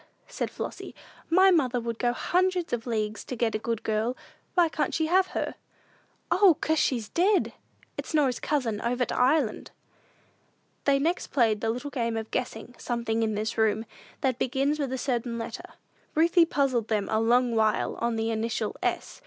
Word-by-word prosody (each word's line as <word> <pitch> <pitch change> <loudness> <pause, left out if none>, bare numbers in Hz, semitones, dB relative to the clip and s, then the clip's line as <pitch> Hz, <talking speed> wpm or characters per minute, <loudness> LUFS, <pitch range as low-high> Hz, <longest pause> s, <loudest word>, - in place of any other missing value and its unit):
said - - -3
Flossy; - - -7 0.3
"my 375 +3 +6
mother 260 -8 +2
would 230 -1 -4
go 240 - +2
hundreds 360 +5 0
of 240 0 -2
leagues 215 -2 -2
to 255 - -6
get 230 -1 0
a 215 - -1
good 230 0 -3
girl. 220 +3 -1 0.4
Why 350 -2 +5
can't 310 -1 -2
she 320 - +1
have 370 +3 +3
her?" - - -2 0.8
"O, 370 -5 +6
'cause, 315 0 +1
she's 235 -5 0
dead! 380 - +2 0.5
It's - - -5
Norah's 280 -6 +2
cousin 235 -8 -1
over 245 +1 0
to - - -4
Ireland." 255 -2 +1 1.2
They 280 -1 +4
next 335 +6 0
played 225 -6 +2
the 225 - 0
little 250 +5 -3
game 230 -4 -1
of 220 0 -5
guessing 245 -1 -4
"something 235 -2 -1
in 220 -1 0
this 215 +2 -2
room," 220 0 +2 0.4
that 260 -3 0
begins 275 +4 0
with 275 -3 -2
a 260 - -2
certain 240 -2 -2
letter. 230 - -7 0.4
Ruthie 335 +2 +5
puzzled 265 -8 0
them 210 -3 0
a 220 - +1
long 240 +2 +3
while 220 -1 +2
on 235 0 -1
the 225 0 -1
initial 220 0 -2
S. - - -2
245 Hz, 180 wpm, -27 LUFS, 225-295 Hz, 1.2 s, my